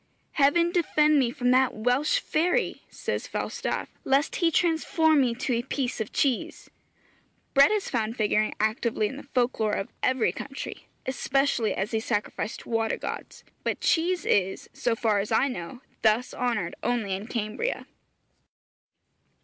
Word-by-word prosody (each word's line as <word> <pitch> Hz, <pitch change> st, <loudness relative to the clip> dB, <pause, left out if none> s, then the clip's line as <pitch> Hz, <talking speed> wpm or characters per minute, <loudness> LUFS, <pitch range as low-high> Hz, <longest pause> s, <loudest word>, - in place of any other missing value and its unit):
'Heaven 335 Hz, +4 st, +3 dB
defend 305 Hz, -4 st, +3 dB
me 255 Hz, -3 st, +2 dB
from 250 Hz, -1 st, 0 dB
that 260 Hz, 0 st, +3 dB
Welsh 250 Hz, -, +2 dB
fairy!' 350 Hz, -6 st, 0 dB
says -, -, -4 dB
Falstaff, -, -, -3 dB, 0.2 s
'lest 275 Hz, +3 st, +1 dB
he 340 Hz, -, +3 dB
transform 320 Hz, -2 st, +3 dB
me 240 Hz, -3 st, +1 dB
to 255 Hz, +1 st, -1 dB
a 235 Hz, -, +1 dB
piece 255 Hz, -2 st, -2 dB
of 220 Hz, -, -4 dB
cheese!' 265 Hz, -5 st, -1 dB, 0.8 s
Bread 275 Hz, 0 st, +7 dB
is 425 Hz, -2 st, 0 dB
found 225 Hz, -1 st, -2 dB
figuring 215 Hz, 0 st, +1 dB
actively 220 Hz, 0 st, 0 dB
in 240 Hz, -, -3 dB
the 285 Hz, -, -8 dB
folk 250 Hz, 0 st, +1 dB
lore 215 Hz, -1 st, +1 dB
of 195 Hz, -, -3 dB
every 255 Hz, -2 st, +2 dB
country, 275 Hz, -1 st, -7 dB, 0.2 s
especially 260 Hz, -3 st, +1 dB
as 200 Hz, +4 st, -3 dB
a 220 Hz, -, +2 dB
sacrifice 215 Hz, -1 st, -2 dB
to -, -, -13 dB
water 225 Hz, -1 st, 0 dB
gods; -, -, -7 dB, 0.2 s
but -, -, -1 dB
cheese 350 Hz, +2 st, +1 dB
is, 190 Hz, -1 st, 0 dB
so 235 Hz, -2 st, 0 dB
far 220 Hz, -3 st, +1 dB
as 200 Hz, +2 st, -3 dB
I 225 Hz, +5 st, +3 dB
know, 245 Hz, +1 st, -6 dB, 0.2 s
thus 220 Hz, +3 st, +2 dB
honoured 230 Hz, -8 st, -1 dB
only 230 Hz, -5 st, -1 dB
in 195 Hz, +3 st, -4 dB
Cambria. 230 Hz, -, -3 dB
245 Hz, 155 wpm, -27 LUFS, 220-285 Hz, 0.8 s, Bread